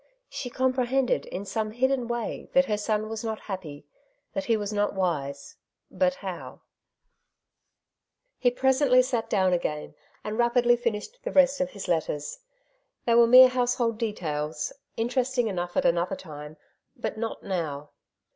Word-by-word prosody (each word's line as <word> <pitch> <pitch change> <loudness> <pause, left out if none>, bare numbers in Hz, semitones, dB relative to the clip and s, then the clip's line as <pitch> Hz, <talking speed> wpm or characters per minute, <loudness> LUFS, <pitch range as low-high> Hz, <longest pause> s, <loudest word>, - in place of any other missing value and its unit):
She 250 - -5
compre 255 0 0
hended 265 0 +1
in 195 +2 -5
some 215 +2 -2
hidden 255 +2 0
way 235 -1 -4
that 270 0 +5
her 215 -5 0
son 210 +1 -1
was 220 0 -5
not 220 -1 -3
happy, 160 -8 -7 0.5
that 290 -1 -2
he 230 -4 +2
was 205 0 -3
not 205 0 0
wise; 140 -7 -2 0.3
but 275 -1 +1
how? 185 -2 -6 1.8
He 245 - +4
presently 260 0 +4
sat 235 -3 -2
down 190 -3 +2
again, 150 -4 -2 0.3
and 215 +2 -4
rapidly 240 0 +4
finished 235 - -3
the - - -4
rest 275 0 +4
of 270 - 0
his 200 -6 -8
letters. 155 -3 -2 0.7
They 235 - +3
were 235 0 +7
mere 255 +2 +9
household 245 -2 0
details, 155 -9 -3 0.2
interesting 245 +1 0
enough 175 -3 -3
at - - +2
another 170 +1 +2
time; 150 -2 -10 0.4
but - - -4
not 230 0 -4
now. 150 -6 -3
225 Hz, 150 wpm, -27 LUFS, 180-250 Hz, 1.8 s, mere